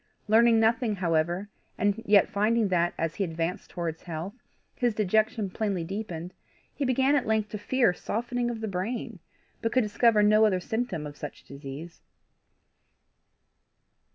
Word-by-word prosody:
Learning 225 +1 +5
nothing, 225 0 +2
however, 175 +1 0 0.3
and 205 +2 +1
yet 205 -1 +6
finding 220 0 +1
that, 175 -1 +1
as 165 -1 -1
he 200 - +1
advanced 165 +2 -3
towards 165 -2 -4
health, 170 +3 -5 0.4
his 240 -3 0
dejection 215 +1 +1
plainly 195 -2 -2
deepened, 180 -2 -5 0.4
he 290 - -3
began 265 +2 +2
at 275 - 0
length 220 -1 +1
to 210 - -5
fear 240 -1 +2
softening 240 +5 -2
of 230 -2 -5
the 220 - -2
brain, 210 +3 -4 0.4
but 225 - 0
could 255 -1 +3
discover 210 +1 +3
no 215 +1 +5
other 200 -4 +3
symptom 200 -5 -3
of 145 0 -8
such 150 -1 -8
disease. 140 +4 -9
210 Hz, 150 wpm, -27 LUFS, 175-225 Hz, 0.4 s, yet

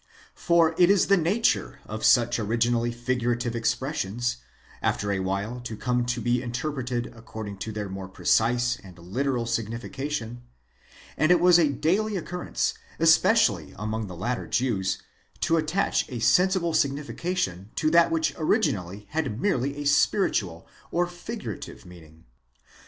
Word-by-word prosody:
For 170 -1 +3
it 175 0 +6
is 200 -2 +4
the 200 - +7
nature 175 - +1
of 110 +1 -6
such 120 0 +4
originally 115 +2 +1
figurative 120 0 -1
expressions, 120 - -1 0.4
after 100 0 0
a 100 - 0
while 100 +6 -2
to 120 -3 -7
come 125 0 0
to 125 0 -1
be 120 +1 +1
interpreted 125 -1 -3
according 110 -3 -8
to 110 +3 -4
their 105 -1 -4
more 95 -1 -6
precise 120 +5 +1
and 95 -3 -14
literal 120 +8 -2
signification; 120 +2 -4 0.8
and 155 - +2
it 180 - +6
was 175 0 +6
a 160 -4 +4
daily 190 +9 0
occurrence, 180 0 -2 0.2
especially 160 -1 +3
among 110 0 -3
the 90 - -8
later 120 +7 -2
Jews, 100 -6 0 0.4
to 165 - +2
attach 160 +5 0
a 125 - -5
sensible 175 - +3
signification 145 - -1
to 155 -1 +1
that 170 0 +5
which 165 -1 0
originally 100 - 0
had 145 -9 -2
merely 140 -6 0
a 145 - -5
spiritual 140 - +1 0.2
or 175 +1 +1
figurative 175 - -7
meaning. 80 -3 -15
120 Hz, 140 wpm, -26 LUFS, 110-160 Hz, 0.8 s, the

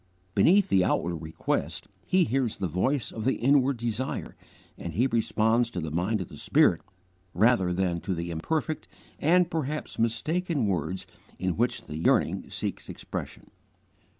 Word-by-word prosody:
Beneath 195 +3 +5
the 95 -2 +4
outward 85 -1 0
request 80 0 -3 0.2
He 185 0 +4
hears 130 -5 0
the 95 - -1
voice 110 - 0
of 110 - -5
the 130 - +2
inward 135 0 +3
desire, 120 +2 -3 0.4
and 85 - -6
He 120 - +3
responds 115 -1 +2
to 95 - -4
the 80 -2 -4
mind 95 +6 0
of 90 - -5
the - - -11
Spirit 85 - +3 0.5
rather 100 -2 +4
than 90 -2 0
to 95 - -2
the 85 +1 -4
imperfect 155 - -2 0.3
and 175 +3 +3
perhaps 155 -1 -3
mistaken 145 +6 0
words 90 -1 -2 0.3
in 95 -1 0
which 120 +3 0
the 75 - -7
yearning 80 - +1
seeks - - -4
expression. - - -7
115 Hz, 150 wpm, -27 LUFS, 90-135 Hz, 0.5 s, Beneath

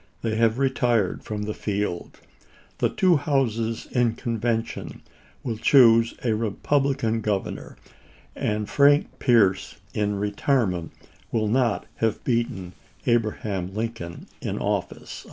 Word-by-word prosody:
They 110 -1 0
have 115 0 +3
retired 125 -7 +1
from 105 -1 -4
the 105 +1 -3
field. 100 -5 -3 0.6
The - - +2
two 185 -5 +3
houses 115 -6 -1
in 120 -3 +2
convention 115 -1 -3 0.4
will 115 -4 -3
choose 115 -2 +5
a 115 -3 +2
Republican 115 +2 0
governor, 105 -2 -3 0.6
and 105 0 -1
Frank 140 +7 +3
Pierce 100 -7 +3 0.2
in 105 -1 0
retirement 100 - 0 0.4
will 110 -2 +1
not 120 -2 +1
have 110 -1 -1
beaten 115 -7 -1 0.3
SSoin0, - - +2
Abraham 105 -5 -2
Lincoln 110 -7 -5 0.2
in - - -3
office." - - -3
115 Hz, 115 wpm, -24 LUFS, 105-120 Hz, 0.6 s, choose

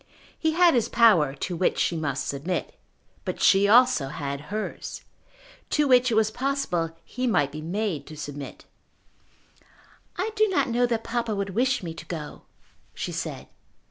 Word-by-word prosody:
He 320 -1 +1
had 345 0 +5
his 240 -4 +1
power 175 - +4
to 175 +5 -4
which 180 - +1
she 170 - +1
must 145 -4 -2
submit. 150 +6 -3 0.5
But - - -4
she 195 +1 +5
also 240 - +5
had 140 0 -4
hers, 215 +2 -5 0.7
to 300 -1 +2
which 255 -1 +5
it 230 - 0
was 220 0 +3
possible 215 -11 -2
he 255 +1 -3
might 145 - +2
be 155 +1 -7
made 175 -3 -3
to 155 - -10
submit. 145 -1 -7 1.5
"I 445 - -1
do 430 +1 +4
not 280 -9 +1
know 245 +1 +2
that 230 -2 -1
papa 230 -2 -2
would 200 -1 -3
wish 255 +3 +1
me 165 -2 -5
to - - -10
go," 155 -4 -6 0.5
she - - -4
said. - - -5
205 Hz, 165 wpm, -25 LUFS, 155-245 Hz, 1.5 s, had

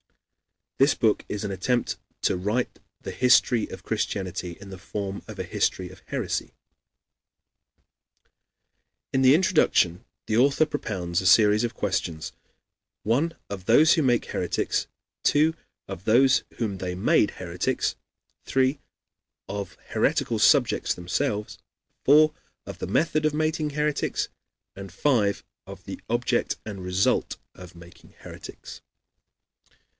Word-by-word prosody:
This 135 +1 +5
book 110 -2 +1
is 105 - -3
an 100 - -3
attempt 120 +6 -1 0.3
to - - +2
write 105 +7 -2 0.2
the - - -6
history 125 -2 +3
of - - -9
Christianity 90 -3 -3
in 100 0 -11
the 95 - -9
form 100 +1 -5
of - - -9
a - - -3
history 90 -1 -1
of 95 0 -15
heresy. - - -3 2.6
In 135 - +2
the 130 +2 +7
introduction 155 - +2 0.2
the 110 - 0
author 140 +5 +4
propounds 90 - -3
a 95 - 0
series 105 +2 +5
of 120 - -2
questions: 85 -5 -2 0.7
(1) 140 +10 +1
Of 95 -2 -7
those 155 +9 +6
who 160 - +2
make 120 -4 +2
heretics; - - -1 0.3
(2) 155 +2 +3 0.3
Of 90 - -8
those 130 +4 +5 0.2
whom 100 -5 -2
they 90 -1 -3
made 95 - +3
heretics; - - -2 0.5
(3) 130 +2 +1 0.7
Of 100 -1 -6
heretical - - 0
subjects - - +3
themselves; 105 +5 -2 0.5
(4) 155 +2 +6 0.3
Of - - -9
the - - -4
method 155 - +1
of 155 -1 +1
making 155 0 0
heretics; 150 0 -1 0.5
and 95 -1 -9
(5) 105 -1 +1 0.2
Of - - -10
the - - -7
object 120 +1 0
and 100 -4 -7
result 90 +1 0 0.2
of 90 -1 -13
making 85 0 -16
heretics. - - -10
110 Hz, 130 wpm, -25 LUFS, 95-135 Hz, 2.6 s, the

